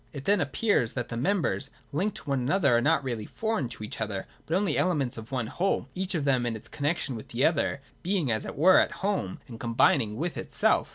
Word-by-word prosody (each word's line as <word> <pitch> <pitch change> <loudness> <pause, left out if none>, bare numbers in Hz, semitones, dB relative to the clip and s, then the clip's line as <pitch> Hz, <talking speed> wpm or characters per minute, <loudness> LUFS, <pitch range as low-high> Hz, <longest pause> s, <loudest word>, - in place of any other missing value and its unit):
It 140 -2 -7
then 200 -1 +3
appears 145 - +1
that 125 -3 -3
the 115 - -4
members, 140 0 0 0.2
linked 185 +8 -1
to - - -10
one 135 - +2
another, 140 +1 +3
are 120 - +4
not 130 - +3
really 120 -5 -3
foreign 220 - -2
to 110 - -8
each 105 - -6
other, 100 -3 -2 0.2
but 165 - 0
only 190 -5 +1
elements 145 -9 +1
of 110 +2 -9
one 130 -4 -1
whole, 185 - -1
each 190 0 -3
of 150 -4 -1
them, 130 -3 +3
in 115 - -1
its 110 - -9
connexion 145 -2 -1
with 110 - -8
the 120 +3 +1
other, 140 -3 +1 0.2
being, 175 -8 0
as 110 - 0
it - - -6
were, 185 +6 +7
at - - +2
home, 195 - -1
and 115 -3 -9
combining 115 -1 +3
with 165 +7 -3
itself. - - +1
140 Hz, 230 wpm, -28 LUFS, 120-180 Hz, 0.2 s, were